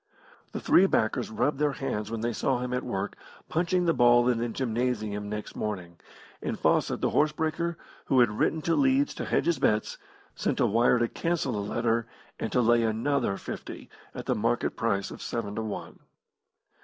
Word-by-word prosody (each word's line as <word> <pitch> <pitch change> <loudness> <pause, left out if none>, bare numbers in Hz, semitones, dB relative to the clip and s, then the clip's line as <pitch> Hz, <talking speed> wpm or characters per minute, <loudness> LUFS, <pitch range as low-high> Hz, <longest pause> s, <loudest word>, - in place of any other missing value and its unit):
The - - -4
three 190 - +5
backers 110 - 0
rubbed 135 +6 0
their 150 -1 +2
hands 105 -6 -3
when 115 -1 -4
they 120 +1 -1
saw 130 +3 0
him 125 0 -3
at 125 - 0
work 100 -5 -3 0.3
punching 175 +2 +1
the 165 - +3
ball 120 -1 +5
in 120 -2 +2
the 120 +1 -1
gymnasium 110 -4 -2
next 105 0 -5
morning; 90 -5 -4 0.4
and - - -3
Fawcett, - - +1
the - - +1
horse 150 +1 +3
breaker, 160 +2 -2 0.3
who 130 - +3
had 120 -3 +5
written 160 -1 +1
to 165 - +1
Leeds 275 +1 +3
to - - -5
hedge - - +1
his 170 -1 +1
bets, 105 0 +1 0.3
sent - - -1
a - - +4
wire 115 +3 +4
to 120 0 +2
cancel 165 0 -1
the 105 - -2
letter, 115 +2 0 0.3
and 110 - -3
to 125 - +3
lay 120 0 +4
another 115 -1 0
fifty - - -8 0.2
at - - -6
the - - +1
market - - 0
price 100 -4 -1
of - - -9
seven 110 -4 -3
to 110 - -3
one. 110 -2 -6
120 Hz, 190 wpm, -28 LUFS, 110-145 Hz, 0.4 s, three